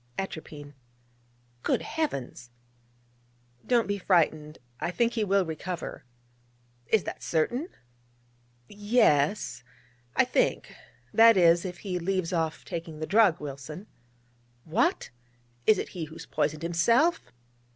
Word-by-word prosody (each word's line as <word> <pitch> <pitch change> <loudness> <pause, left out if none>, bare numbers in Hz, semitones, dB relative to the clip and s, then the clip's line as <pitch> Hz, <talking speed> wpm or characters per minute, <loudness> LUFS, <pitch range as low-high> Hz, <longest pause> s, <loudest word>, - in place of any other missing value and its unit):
'Atropine.' 150 -6 -6 0.9
'Good - - 0
Heavens!' 140 - -4 1.2
'Don't 240 -2 +3
be 200 0 -2
frightened: 155 -4 +1 0.2
I - - -2
think 235 +6 +1
he 225 - 0
will 195 -1 +2
recover.' 170 0 -6 0.8
'Is 220 -3 +2
that - - -6
certain?' 245 - -1 1.0
'Yes, 200 - +1 0.5
I - - +4
think - - 0 0.4
that 225 -1 +7
is, 170 0 +5
if 180 -1 -5
he 180 -2 -2
leaves 185 0 -1
off 160 -2 -2
taking 165 -2 -6
the 155 - -3
drug, 200 -3 +4
Wilson.' 150 +5 -8 0.8
'What! 230 - 0 0.6
it 215 - +6
is - - -4
he 175 -4 -5
who 155 +1 -13
has - - -9
poisoned 155 +1 -2
himself?' 230 - +2
175 Hz, 120 wpm, -27 LUFS, 155-210 Hz, 1.2 s, that